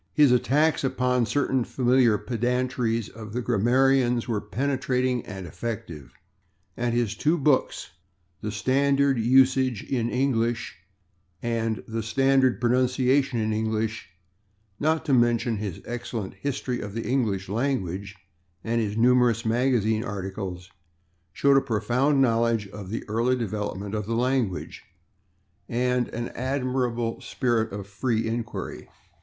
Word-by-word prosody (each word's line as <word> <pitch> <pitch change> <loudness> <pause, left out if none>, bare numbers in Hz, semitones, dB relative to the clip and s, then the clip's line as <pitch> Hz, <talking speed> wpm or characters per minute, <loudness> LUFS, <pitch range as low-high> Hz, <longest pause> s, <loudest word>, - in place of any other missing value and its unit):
His 145 +4 +5
attacks 145 +6 +2
upon 125 -2 +1
certain 135 -2 +1
familiar 125 -3 +3
pedantries 120 -1 -1
of 110 -1 -10
the 125 - -1
grammarians 125 +2 +2
were 110 -4 -1
penetrating 125 +1 -1
and 95 -2 -7
effective, 85 - -6 0.6
and 120 -1 -1
his 120 -4 0
two 155 +3 +1
books, 140 - +1 0.5
"The 105 - -3
Standard 140 +3 +2
of - - 0
Usage 130 -1 +3
in 120 -3 -1
English" 120 -3 0 0.7
and 115 -2 -1
"The 115 0 -3
Standard 135 +3 +3
of - - -18
Pronunciation 130 +1 +2
in 110 0 0
English," 110 0 -2 0.7
not 160 +2 +1
to 145 - +1
mention 120 -2 +2
his 100 -4 -5
excellent 115 -4 -5
"History 130 -3 -3
of 105 0 -7
the 115 - -2
English 110 -7 0
Language" 100 -4 -2 0.5
and 115 +1 0
his 105 -1 -2
numerous 120 -1 +3
magazine 110 -2 +1
articles, 95 -4 -5 0.6
showed 140 +6 +3
a - - +5
profound 125 +5 +1
knowledge 115 -4 +2
of 100 -2 -9
the 115 - -4
early 115 +4 +1
development 105 -3 -4
of 105 -2 -3
the 115 - -1
language, 125 -5 -1 0.9
and 125 0 +1
an 120 +1 -5
admirable 125 -3 -2
spirit 115 -3 0
of 100 -1 -6
free 110 +3 -1
inquiry. 115 +1 -5
120 Hz, 130 wpm, -25 LUFS, 110-130 Hz, 0.9 s, His